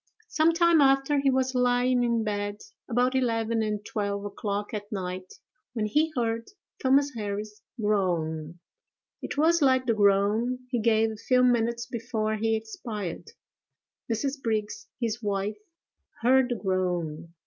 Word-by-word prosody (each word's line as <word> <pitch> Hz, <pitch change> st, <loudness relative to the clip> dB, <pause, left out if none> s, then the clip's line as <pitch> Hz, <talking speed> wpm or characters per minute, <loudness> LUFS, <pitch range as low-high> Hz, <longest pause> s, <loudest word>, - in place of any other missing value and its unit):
Some 320 Hz, +1 st, +3 dB
time 340 Hz, -2 st, +4 dB
after, 275 Hz, +1 st, +3 dB
he 275 Hz, 0 st, +2 dB
was 260 Hz, 0 st, +1 dB
lying 250 Hz, 0 st, +2 dB
in 235 Hz, -2 st, +1 dB
bed, 205 Hz, -1 st, -3 dB, 0.3 s
about 250 Hz, +2 st, +2 dB
eleven 230 Hz, -3 st, +1 dB
and 210 Hz, -1 st, -2 dB
twelve 200 Hz, -1 st, -3 dB
o'clock 205 Hz, +1 st, -4 dB
at 205 Hz, 0 st, -5 dB
night, 185 Hz, -2 st, -5 dB, 0.4 s
when 220 Hz, -3 st, -1 dB
he 300 Hz, +9 st, +1 dB
heard 230 Hz, -2 st, -1 dB, 0.3 s
Thomas 275 Hz, +2 st, +3 dB
Harris 210 Hz, -1 st, -5 dB, 0.2 s
groan; 170 Hz, -6 st, -1 dB, 0.6 s
it -, -, -5 dB
was 330 Hz, +3 st, +4 dB
like 260 Hz, -2 st, +4 dB
the 235 Hz, -, +2 dB
groan 210 Hz, +4 st, +2 dB
he 245 Hz, -, +1 dB
gave 220 Hz, 0 st, +3 dB
a -, -, -6 dB
few 250 Hz, +3 st, +2 dB
minutes 235 Hz, -1 st, +2 dB
before 220 Hz, -2 st, -2 dB
he 225 Hz, +1 st, +1 dB
expired: 220 Hz, -, -6 dB, 0.8 s
Mrs. 270 Hz, +5 st, -2 dB
Brigs, 225 Hz, -, -2 dB
his 230 Hz, -1 st, -2 dB
wife, 205 Hz, 0 st, -2 dB, 0.6 s
heard 260 Hz, +1 st, +4 dB
the 245 Hz, -, 0 dB
groan. 175 Hz, -5 st, -2 dB
225 Hz, 140 wpm, -27 LUFS, 205-255 Hz, 0.8 s, time